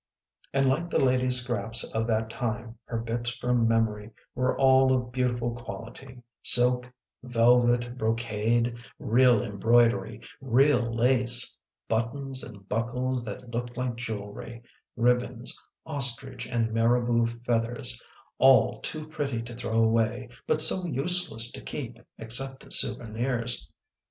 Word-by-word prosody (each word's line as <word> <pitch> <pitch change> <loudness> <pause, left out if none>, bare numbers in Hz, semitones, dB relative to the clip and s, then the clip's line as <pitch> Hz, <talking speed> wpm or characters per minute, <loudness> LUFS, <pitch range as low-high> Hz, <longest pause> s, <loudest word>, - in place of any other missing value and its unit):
And 135 0 +2
like 160 +6 0
the - - 0
ladies 125 -1 +2
scraps 115 -2 -1
of 110 0 -1
that 110 -1 0
time 115 -1 -4
her 115 - -4
bits 120 +1 -3
from 125 -2 +1
memory 110 -2 0 0.2
were 125 0 0
all 130 -1 +5
of 125 -1 0
beautiful 120 -2 -1
quality: 120 +1 -10 0.2
silk, 125 0 +2 0.3
velvet, 120 0 +2
brocade, 115 +1 0 0.2
real 120 -1 +3
embroidery, 115 +1 +1 0.2
real 130 -1 +2
lace; 125 +1 +4 0.3
buttons 130 +4 -2
and 100 -3 -11
buckles 125 +3 -2
that 125 +1 -8
looked 120 +1 -5
like 125 -2 -2
jewelry, 115 0 -7 0.3
ribbons, 125 0 0 0.3
ostrich 135 -4 -1
and 115 -2 -1
marabout 115 0 +1
feathers, 115 0 0 0.4
all 135 0 +6
too 155 -1 -5
pretty 140 -6 -3
to 120 +1 -9
throw 115 -1 0
away 115 +2 0 0.2
but 155 - +6
so 185 - +4
useless 150 -6 0
to - - -9
keep 120 -5 -7 0.2
except 130 +4 0
as - - 0
souvenirs. 120 0 -2
120 Hz, 125 wpm, -27 LUFS, 115-130 Hz, 0.4 s, all